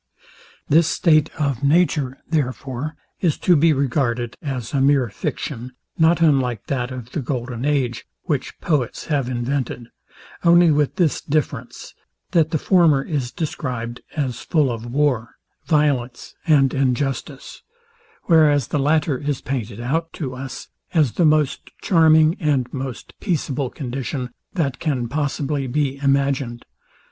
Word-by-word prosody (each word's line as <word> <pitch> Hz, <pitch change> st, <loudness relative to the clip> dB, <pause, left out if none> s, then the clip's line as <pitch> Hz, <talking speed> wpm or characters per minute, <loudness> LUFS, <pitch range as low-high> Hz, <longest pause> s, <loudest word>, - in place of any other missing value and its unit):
This 160 Hz, +2 st, +4 dB
state 155 Hz, -2 st, +3 dB
of 140 Hz, -5 st, -1 dB
nature, 145 Hz, -3 st, +2 dB
therefore, 140 Hz, -1 st, -2 dB, 0.2 s
is 165 Hz, -5 st, +1 dB
to 180 Hz, -, +3 dB
be 160 Hz, +2 st, +4 dB
regarded 125 Hz, -4 st, 0 dB
as 130 Hz, -6 st, -4 dB
a 140 Hz, -, +2 dB
mere 135 Hz, -3 st, +3 dB
fiction, 120 Hz, +5 st, -5 dB, 0.2 s
not 165 Hz, +1 st, +3 dB
unlike 130 Hz, -8 st, +2 dB
that 125 Hz, -3 st, -2 dB
of 125 Hz, -2 st, -8 dB
the -, -, -2 dB
golden 125 Hz, -2 st, -3 dB
age, 130 Hz, -5 st, 0 dB, 0.2 s
which 145 Hz, -4 st, -3 dB
poets 145 Hz, -8 st, -1 dB
have 135 Hz, -4 st, 0 dB
invented; 125 Hz, -1 st, -3 dB, 0.5 s
only 170 Hz, -1 st, +6 dB
with 145 Hz, -1 st, +1 dB
this 165 Hz, -7 st, +1 dB
difference, 150 Hz, 0 st, -3 dB, 0.4 s
that 160 Hz, -2 st, +3 dB
the 160 Hz, -, 0 dB
former 160 Hz, -5 st, +4 dB
is 140 Hz, -6 st, -3 dB
described 125 Hz, -6 st, -4 dB, 0.2 s
as 130 Hz, -5 st, -1 dB
full 150 Hz, -6 st, +1 dB
of 115 Hz, 0 st, -6 dB
war, 130 Hz, -4 st, 0 dB, 0.3 s
violence 140 Hz, -6 st, 0 dB
and 140 Hz, -4 st, +4 dB
injustice; 135 Hz, 0 st, -2 dB, 0.6 s
whereas 150 Hz, -6 st, +4 dB
the 150 Hz, -, 0 dB
latter 145 Hz, -1 st, +1 dB
is 145 Hz, -2 st, -2 dB
pointed 120 Hz, -5 st, -4 dB
out 160 Hz, +7 st, -1 dB
to 135 Hz, -6 st, -4 dB
us, 130 Hz, +1 st, -7 dB, 0.3 s
as 150 Hz, -7 st, +4 dB
the 175 Hz, -, +1 dB
most 155 Hz, -2 st, +2 dB
charming 160 Hz, -2 st, +4 dB
and 140 Hz, -6 st, 0 dB
most 130 Hz, -2 st, -6 dB
peaceable 145 Hz, -, -1 dB
condition, 125 Hz, -1 st, -4 dB, 0.2 s
that 140 Hz, -7 st, -1 dB
can 135 Hz, -7 st, -1 dB
possibly 145 Hz, 0 st, -2 dB
be 140 Hz, +1 st, -1 dB
imagined. 135 Hz, -3 st, 0 dB
140 Hz, 135 wpm, -21 LUFS, 125-155 Hz, 0.6 s, only